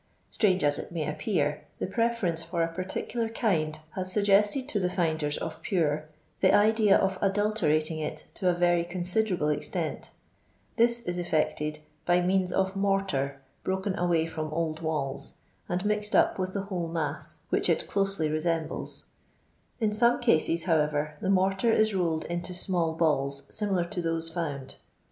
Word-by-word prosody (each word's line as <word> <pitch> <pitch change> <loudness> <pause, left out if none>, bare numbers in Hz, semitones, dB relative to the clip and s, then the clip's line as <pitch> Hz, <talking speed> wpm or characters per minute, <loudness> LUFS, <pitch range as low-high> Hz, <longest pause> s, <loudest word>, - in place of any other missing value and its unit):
Strange 190 -4 +2
ns 145 0 +3
it - - -7
nay 165 -3 -2
appear, 150 -2 -1 0.2
the - - -2
preference 210 -5 0
for 170 0 -1
a - - +1
particular 190 +6 -3
kind 155 -9 0
has 185 0 -3
loggested 210 +5 +3
to 220 -8 0
the 180 -2 0
finders 160 -4 0
of 160 - -6
Pure 155 -5 0 0.3
the - - +4
idea 215 -1 +5
of 190 -1 -1
adultecating 195 -6 +1
it 150 - -4
to 185 - 0
a - - +3
very 175 -1 +3
considerable 180 -1 0
extent; 150 - -2 0.6
this 235 0 +3
is 175 0 -3
effected 150 -2 -1 0.2
by 175 0 +3
means 185 0 +2
of 190 +1 0
mortar 195 -9 0 0.2
broken 190 +1 -1
away 170 -2 +1
from 155 -1 -5
old 160 0 -2
walls, 150 -4 -3 0.3
and 180 +3 -1
mixed 210 0 0
up - - +3
with 185 0 -2
the 200 - -1
whole 185 -4 -3
mass, 160 -2 -3
which - - +2
it - - +2
closely 195 -5 0
resembles; 160 +1 -2 0.7
in 215 -3 +1
some 235 +3 +4
cases, 165 -7 +3
however, 150 -3 +1
tho 190 - -1
mortar 195 +3 +2
is 220 -1 +3
rolled 170 -4 0
into 175 +1 -3
small 175 -3 +1
balls 140 -4 +2
similar 195 -5 +1
to 175 +1 -3
those 165 0 -1
found. 145 -6 -4
175 Hz, 160 wpm, -28 LUFS, 155-195 Hz, 0.7 s, idea